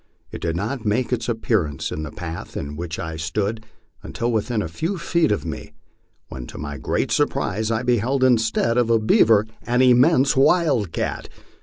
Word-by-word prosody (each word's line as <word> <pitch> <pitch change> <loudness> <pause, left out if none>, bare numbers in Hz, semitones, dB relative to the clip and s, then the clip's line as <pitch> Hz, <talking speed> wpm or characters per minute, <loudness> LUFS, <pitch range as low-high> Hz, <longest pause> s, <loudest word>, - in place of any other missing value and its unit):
It - - -7
did 85 -1 -1
not 110 +7 -3
make 120 +4 0
its 120 -1 -2
appearance 110 - -1
in 75 - -4
the 75 - -5
path 80 +2 -7
in 70 +1 -5
which 80 0 -5
I 80 -1 -5
stood 105 +7 -3 0.3
until 120 +1 -3
within 110 0 -1
a - - -4
few 165 - -3
feet 170 -2 +1
of 105 - -1
me, 80 - -7 0.5
when 65 -2 -8
to - - -10
my 75 -1 -6
great - - -1
surprise 110 +3 0
I 115 +1 -1
beheld 125 +2 +1
instead 115 -1 +2
of 120 -2 +1
a 115 - +4
beaver 110 -1 +4 0.2
an 125 +1 +1
immense 130 +3 +4
wildcat. 135 - +1
110 Hz, 175 wpm, -22 LUFS, 85-125 Hz, 0.5 s, a